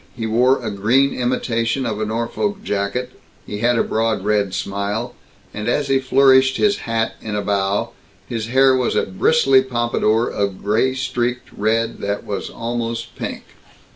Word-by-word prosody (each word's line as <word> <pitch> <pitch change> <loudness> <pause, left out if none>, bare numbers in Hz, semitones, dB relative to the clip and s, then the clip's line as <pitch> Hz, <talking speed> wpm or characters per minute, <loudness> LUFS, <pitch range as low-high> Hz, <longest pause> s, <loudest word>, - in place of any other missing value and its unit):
He 115 - -3
wore 125 +3 +2
a 110 - -2
green 115 +8 +2
imitation 125 0 -1
of 110 -2 -2
a - - 0
Norfolk 115 - -2
jacket, 105 +6 -2 0.3
he 105 - -6
had 120 +1 +2
a - - +3
broad 110 -3 -1
red 105 -2 +1
smile, 100 +5 -3 0.4
and 105 +1 -5
as 140 +3 0
he 135 0 +3
flourished 130 0 +4
his 205 -1 +2
hat 115 0 0
in 110 -1 -4
a 105 - -1
bow, 100 0 0 0.3
his 115 -2 -4
hair 130 +2 +4
was 125 -1 0
a - - +2
bristly 135 +7 +3
pompadour 120 -2 +1
of 100 -2 -3
gray 115 +6 +1
streaked 125 -1 -2
red 115 +2 0
that 100 0 -3
was 100 - -4
almost 115 0 -4
pink. - - -5
115 Hz, 165 wpm, -20 LUFS, 105-130 Hz, 0.4 s, flourished